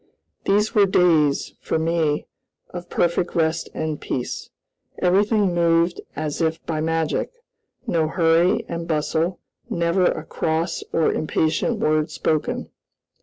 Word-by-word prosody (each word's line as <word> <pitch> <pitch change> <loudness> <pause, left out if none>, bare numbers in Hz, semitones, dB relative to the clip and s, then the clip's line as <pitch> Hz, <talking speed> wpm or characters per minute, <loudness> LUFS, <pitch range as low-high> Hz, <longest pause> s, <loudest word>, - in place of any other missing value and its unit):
These 210 +2 +2
were 205 -2 +5
days, 160 -6 +3
for - - -1
me, 160 -2 0 0.5
of 175 0 -7
perfect 175 +1 0
rest 160 -1 0
and 155 -1 -3
peace. 125 - -4 0.5
Everything 200 +1 +2
moved 170 0 +2
as 155 +1 -3
if 160 0 0
by 155 -2 -2
magic, 165 -1 -1 0.5
no 160 -2 +1
hurry 165 +2 +2
and 170 0 -4
bustle, 160 +3 0 0.3
never 170 +2 +1
a 155 - 0
cross 160 +2 -1
or 165 - +2
impatient 160 +8 0
word 155 -4 +1
spoken. 155 -1 -2
165 Hz, 125 wpm, -22 LUFS, 155-175 Hz, 0.5 s, were